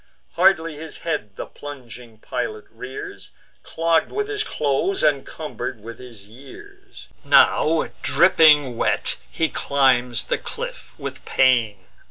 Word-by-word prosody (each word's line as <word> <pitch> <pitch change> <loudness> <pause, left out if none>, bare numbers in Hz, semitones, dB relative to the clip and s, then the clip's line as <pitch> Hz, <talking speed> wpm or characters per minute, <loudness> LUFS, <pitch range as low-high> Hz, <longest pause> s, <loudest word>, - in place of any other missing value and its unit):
Hardly 165 -4 +2
his 160 0 -8
head 130 - -3
the - - -6
plunging 125 -5 -11
pilot 435 - -5
rears, 405 -1 -9 0.3
Clogg'd 165 -1 0
with 420 0 -2
his 420 0 -2
clothes, 150 - -1
and 145 -3 +2
cumber'd 125 -7 -6
with 115 0 -9
his 120 -5 -12
years: 395 - -15 0.2
Now - - +4
dropping 145 -6 +4
wet, - - 0
he 160 - 0
climbs 130 -5 +1
the - - -2
cliff - - -8
with - - -7
pain. 115 -7 +2
145 Hz, 125 wpm, -22 LUFS, 120-165 Hz, 0.3 s, Now